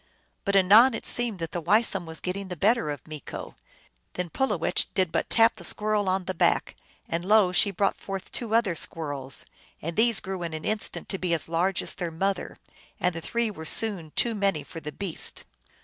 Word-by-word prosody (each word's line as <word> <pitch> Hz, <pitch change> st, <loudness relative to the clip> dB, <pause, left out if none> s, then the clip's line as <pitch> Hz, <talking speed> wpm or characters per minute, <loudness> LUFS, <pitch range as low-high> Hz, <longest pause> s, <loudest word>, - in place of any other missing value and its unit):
But 200 Hz, -1 st, +1 dB
anon 215 Hz, +6 st, +7 dB
it -, -, -5 dB
seemed 240 Hz, -4 st, 0 dB
that 165 Hz, -2 st, -5 dB
the 175 Hz, -, -3 dB
Weisum 195 Hz, 0 st, +2 dB
was 160 Hz, 0 st, -7 dB
getting 190 Hz, +2 st, -3 dB
the 180 Hz, -, -5 dB
better 200 Hz, -1 st, +2 dB
of 145 Hz, -3 st, -5 dB
Meeko. 155 Hz, -3 st, -8 dB, 0.6 s
Then 180 Hz, -2 st, -4 dB
Pulowech 180 Hz, -9 st, +2 dB
did 185 Hz, -3 st, +1 dB
but -, -, -1 dB
tap 225 Hz, -1 st, +4 dB
the 175 Hz, -, -10 dB
squirrel 210 Hz, +1 st, +1 dB
on 185 Hz, 0 st, 0 dB
the 185 Hz, -, -2 dB
back, 165 Hz, -, +1 dB, 0.3 s
when 165 Hz, +1 st, -2 dB
lo! 200 Hz, 0 st, +4 dB
she 180 Hz, +3 st, +3 dB
brought 195 Hz, 0 st, 0 dB
forth 195 Hz, -1 st, -6 dB
two 225 Hz, -3 st, -2 dB
other 230 Hz, -6 st, +2 dB
squirrels, 145 Hz, -5 st, -1 dB, 0.3 s
and 165 Hz, +2 st, -5 dB
these 230 Hz, -1 st, +4 dB
grew 190 Hz, -1 st, -5 dB
in 165 Hz, -2 st, -4 dB
an 155 Hz, -, -7 dB
instant 215 Hz, 0 st, -2 dB
to 195 Hz, -, -3 dB
be 175 Hz, -2 st, +1 dB
as 160 Hz, -, +3 dB
large 175 Hz, +4 st, 0 dB
as -, -, 0 dB
their 175 Hz, -3 st, -4 dB
mother, 195 Hz, +4 st, -2 dB, 0.4 s
and 180 Hz, 0 st, +1 dB
the 165 Hz, -, -6 dB
three 235 Hz, +4 st, -1 dB
were 160 Hz, -6 st, -9 dB
soon 190 Hz, -2 st, +1 dB
too 235 Hz, -, +2 dB
many 195 Hz, -8 st, 0 dB
for 165 Hz, -, -9 dB
the 150 Hz, -1 st, -7 dB
beast. 190 Hz, 0 st, -2 dB
185 Hz, 205 wpm, -26 LUFS, 165-210 Hz, 0.6 s, anon